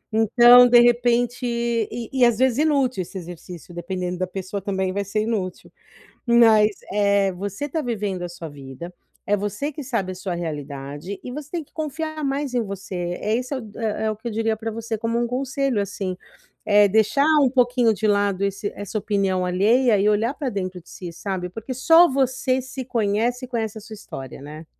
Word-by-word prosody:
Então, 240 +3 +7
de 240 0 +7
repente 240 +1 +2
e 235 -1 -2
e 260 -2 +2
às 235 -2 +4
vezes, 260 +1 +2
inútil 275 -8 +2
esse 185 +2 -7
exercício, 175 0 -9
dependendo 180 +1 -4
da 185 - -1
pessoa 190 +2 -5
também, 190 -1 -2
vai 200 +1 -1
ser 210 +2 -1
inútil. 200 -5 -3 0.6
Mas, 225 -3 +6 0.2
eh, 200 -1 +2
você 200 +8 -4
tá 315 +2 -2
vivendo 205 -8 -3
a - - -4
sua 170 -2 -8
vida, 140 +4 -9 0.3
é 205 - +2
você 210 +9 -3
que 295 +1 -7
sabe 230 -8 -2
a - - -7
sua 185 -1 -4
realidade, 145 +1 -6
e - - -7
você 295 +1 -7
tem 340 -3 -3
que - - -34
confiar 310 0 -4
mais 275 0 -2
em 245 - +2
você, 195 -2 -7 0.3
é 215 +2 0
esse 250 +3 -3
é 265 - -2
o 220 -4 -9
é 220 0 -1
o 215 - -4
que 220 +3 -6
eu 230 - -5
diria 225 0 0
pra 225 +1 -4
você 225 0 -4
como 230 +1 -1
um 240 - +1
conselho 265 -1 -1
assim. 200 -2 -3 0.6
É 205 0 +7
deixar 220 +7 +3 0.2
um 265 - +5
pouquinho 245 -3 +3
de 215 +2 -1
lado 200 -2 +1
esse 200 +1 -2
essa 205 +1 -4
opinião 195 -3 0
alheia 215 +5 +3
e 200 - +2
olhar 225 +6 +1
pra 275 -4 -3
dentro 185 -3 -4
de - - -18
si, 175 -2 -8
sabe. 185 0 -4
Porque 225 +7 -7
só 325 +7 +6
você 260 -1 0
se 260 0 -7
conhece 235 +2 0
e - - -24
conhece 225 -3 -3
a - - -10
sua 215 +1 -10
história, 135 - -9
né. 155 +3 -9
215 Hz, 200 wpm, -23 LUFS, 190-245 Hz, 0.6 s, Então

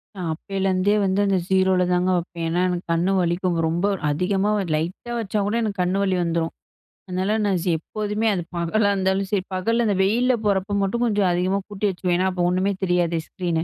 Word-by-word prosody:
நான் 180 -4 -4
அப்பேலருந்தே 195 +2 0
வந்து 190 +1 +1
அந்த 195 -1 +2
0ல 190 -1 +3
தாங்க 180 +1 +1
வப்பேன். 170 -1 -4
ஏன்னா 175 +2 +1
எனக்கு 180 0 -3
கண் 170 +3 +1
வலிக்கும் 175 0 0
ரொம்ப, 170 +4 0 0.2
அதிகமா 190 +6 0 0.3
லைட்டா 175 +9 -4
வச்சா 215 -1 -2
கூட 210 +3 -1
எனக்கு 205 -3 -3
கண் 180 +2 +1
வலி 190 -2 +1
வந்துரும். 165 -1 -1 0.5
அதனால 185 +3 -1
நான் 195 -3 +1
ஜீ 180 - -1
எப்போதுமே 210 +5 -2
அது 185 - -1
பகலா 200 +5 +1
இருந்தாலும் 190 0 0
சரி, 195 -3 +1
பகல்ல 230 +6 +1
அந்த 205 - +1
வெயில்ல 240 +6 +3
போறப்போ 200 0 +1
மட்டும் 215 +5 0
கொஞ்சம் 205 -4 +2
அதிகமா 185 +3 +1
கூட்டி 205 0 -3
வச்சுக்குவேன் 180 -1 -1
ஏனா 185 - +1
அப்போ 180 - -3
ஒண்ணுமே 185 +2 +1
தெரியாதே 175 -2 +1
ஸ்க்ரீனு. 170 -3 -2
190 Hz, 185 wpm, -23 LUFS, 180-200 Hz, 0.5 s, 0ல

